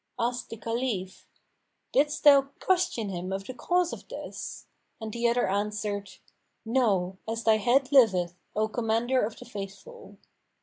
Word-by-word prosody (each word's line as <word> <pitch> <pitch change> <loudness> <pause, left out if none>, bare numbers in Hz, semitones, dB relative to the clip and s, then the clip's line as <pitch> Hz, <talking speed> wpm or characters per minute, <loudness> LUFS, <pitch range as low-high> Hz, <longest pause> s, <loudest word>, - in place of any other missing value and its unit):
Asked 245 +1 -2
the 225 - -7
Caliph, 225 -4 -3 0.6
"Didst 295 +2 +1
thou 275 -2 +7
question 350 - +1
him 185 0 -4
of 195 0 -3
the 255 - -6
cause 355 +6 +1
of - - -9
this?"; - - -7 0.3
and 220 -2 -6
the 235 0 +1
other 240 +1 +2
answered, 205 0 -2 0.5
"No, 200 -6 +1
as 225 +1 -3
thy 220 -1 +5
head 255 +5 +2
liveth, 190 -10 +5 0.2
O 215 +1 +2
Commander 230 +3 +1
of 215 +1 -3
the 250 - -11
Faithful." 230 - -9
225 Hz, 145 wpm, -28 LUFS, 200-255 Hz, 0.6 s, thou